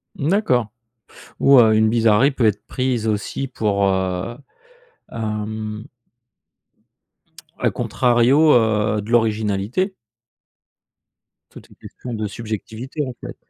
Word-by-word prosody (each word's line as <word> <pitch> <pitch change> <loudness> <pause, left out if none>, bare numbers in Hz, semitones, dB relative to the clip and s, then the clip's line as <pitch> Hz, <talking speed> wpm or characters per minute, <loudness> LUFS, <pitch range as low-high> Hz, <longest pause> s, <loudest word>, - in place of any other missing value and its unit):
D'accord. 145 - +1 0.7
Ou, 140 -1 +6
heu, 110 -2 +5
une 110 0 +3
bizarrerie 115 +3 +3
peut 130 -4 0
être 105 -1 -1
prise 125 -3 -2
aussi 110 +5 -2
pour, 105 -6 -1
heu, 95 +3 -1 0.8
hem 110 0 -5 1.7
à - - +2
contrario, 130 +5 +3
heu, 110 -2 +2
de 110 +4 -8
l'originalité. 110 - 0 1.6
Tout - - -12
est - - -19
question 125 - -10
de 110 -1 -3
subjectivité, 115 +6 -6
en 130 - -6
fait. - - -8
110 Hz, 105 wpm, -20 LUFS, 105-125 Hz, 1.7 s, Ou